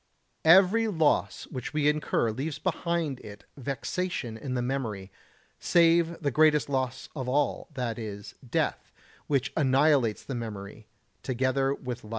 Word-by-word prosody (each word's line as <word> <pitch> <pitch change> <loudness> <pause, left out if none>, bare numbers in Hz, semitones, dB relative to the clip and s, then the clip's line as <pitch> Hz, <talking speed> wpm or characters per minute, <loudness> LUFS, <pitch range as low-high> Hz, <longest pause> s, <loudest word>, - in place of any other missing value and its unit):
Every 190 +7 +6
loss 160 -7 +1
which 130 -3 -5
we 150 -1 +2
incur 150 -6 +1
leaves 140 +7 -4
behind 165 -6 -1
it 100 -1 -11
vexation 140 -1 -3
in 125 +3 -5
the 125 - 0
memory, 110 -7 -3 0.5
save 170 -1 +3
the 140 - +1
greatest 150 +1 +4
loss 130 -2 -2
of 130 -3 -3
all, 145 +2 0
that 120 -3 -3
is, 105 -2 -7
death, 120 - -2 0.4
which 140 -4 0
annihilates 135 -5 +3
the 135 - -6
memory, 105 -3 -7 0.3
together 130 +1 0
with 125 -3 -6
life. 105 - -12
135 Hz, 140 wpm, -28 LUFS, 120-155 Hz, 0.5 s, Every